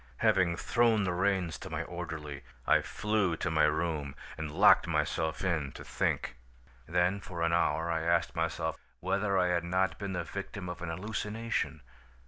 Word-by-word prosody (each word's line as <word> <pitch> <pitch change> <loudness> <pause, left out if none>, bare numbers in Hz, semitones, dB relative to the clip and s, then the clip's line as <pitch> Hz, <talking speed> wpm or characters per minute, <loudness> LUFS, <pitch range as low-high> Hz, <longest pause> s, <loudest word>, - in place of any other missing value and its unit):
Having 85 -2 +3
thrown 115 -1 +3
the 90 -2 0
reins 90 -5 0
to - - -7
my - - -2
orderly, 75 -3 -6 0.2
I - - +5
flew 105 -5 0
to 85 - -1
my 80 -1 +4
room 75 -3 -1 0.2
and 80 -1 -4
locked - - +6
myself 80 +1 0
in 80 -7 0
to - - -9
think. - - -1 0.5
"Then 90 +4 +2
for 90 -4 -5
an 85 0 +2
hour 80 0 +2
I 80 -1 0
asked 85 +1 +1
myself - - -1 0.2
whether 95 +2 +1
I 90 -1 +3
had 85 -1 +1
not 95 +2 0
been 100 -2 -3
the 85 -1 -1
victim 100 0 -6
of 90 - -6
an 85 - -3
hallucination. 105 -1 -2
90 Hz, 170 wpm, -31 LUFS, 80-100 Hz, 0.5 s, locked